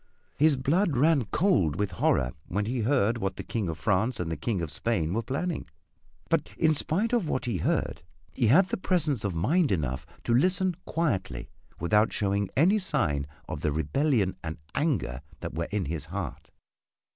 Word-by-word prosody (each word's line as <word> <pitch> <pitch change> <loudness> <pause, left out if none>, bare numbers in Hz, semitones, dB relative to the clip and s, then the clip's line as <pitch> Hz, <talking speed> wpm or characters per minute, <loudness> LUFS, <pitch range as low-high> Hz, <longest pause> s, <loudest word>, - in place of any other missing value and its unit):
His 155 0 +4
blood 145 +4 +1
ran 145 -2 +4
cold 150 - +2
with 100 +1 -1
horror 65 -7 +1 0.2
when 100 +3 -1
he 120 +3 -2
heard 115 -1 +2
what 95 -2 -2
the - - -6
King 105 -7 -2
of 80 - -4
France 110 +5 +1
and 85 -2 -2
the - - -1
King 100 +7 -2
of 80 - -4
Spain 85 -1 -1
were 115 - 0
planning 150 +9 -3 0.6
but - - +1
in 160 -1 +4
spite 180 +10 0
of 210 -10 +1
what 130 - -1
he 115 -6 -1
heard 80 - -1 0.3
he 115 - +1
had 175 - +6
presence 155 - +1
of 100 -4 -2
mind 145 - +2
enough 70 -8 -1 0.2
to 120 - +1
listen 180 +7 +3
quietly 95 - -2 0.3
without 105 +6 +3
showing 100 -1 0
any 190 +9 +5
sign 100 - 0 0.2
of - - -5
the 75 - +1
rebellion 95 - +1
and 80 -1 -4 0.2
anger 140 - 0 0.2
that - - -5
were 85 +1 -2
in 105 -2 -1
his 80 0 -3
heart. - - -6
115 Hz, 180 wpm, -28 LUFS, -, 0.6 s, had